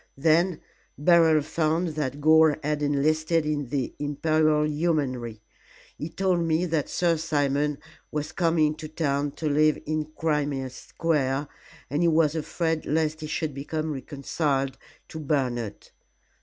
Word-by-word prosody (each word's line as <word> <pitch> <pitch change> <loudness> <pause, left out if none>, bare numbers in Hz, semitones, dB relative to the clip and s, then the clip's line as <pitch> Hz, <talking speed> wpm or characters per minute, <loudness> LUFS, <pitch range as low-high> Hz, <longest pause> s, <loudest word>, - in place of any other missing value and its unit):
Then 165 +4 +2 0.4
Beryl 160 -1 +5
found 160 +2 0
that 145 -3 -3
Gore 155 0 +5
had 150 0 -1
enlisted 155 +3 +1
in 145 -3 -1
the 135 -1 -2
Imperial 150 +1 +2
Yeomanry. 140 -8 -1 0.5
He 155 - -5
told 185 0 0
me 165 +1 +1
that 160 -4 -1
Sir 170 -2 +1
Simon 145 -2 0 0.3
was 150 +1 -3
coming 165 -4 +2
to 155 - -7
town 145 -2 -1
to 155 - -4
live 150 +1 +3
in 155 0 -1
Crimea 145 -4 -1
Square, 140 0 -1 0.4
and 145 +5 -1
he 170 - +4
was 160 -2 +3
afraid 160 0 -2
lest 155 +1 0
he 155 - -4
should 155 -1 -2
become 155 +3 -3
reconciled 135 0 -2 0.3
to 160 - -7
Bernard. 125 -8 -2
155 Hz, 135 wpm, -26 LUFS, 145-160 Hz, 0.5 s, Beryl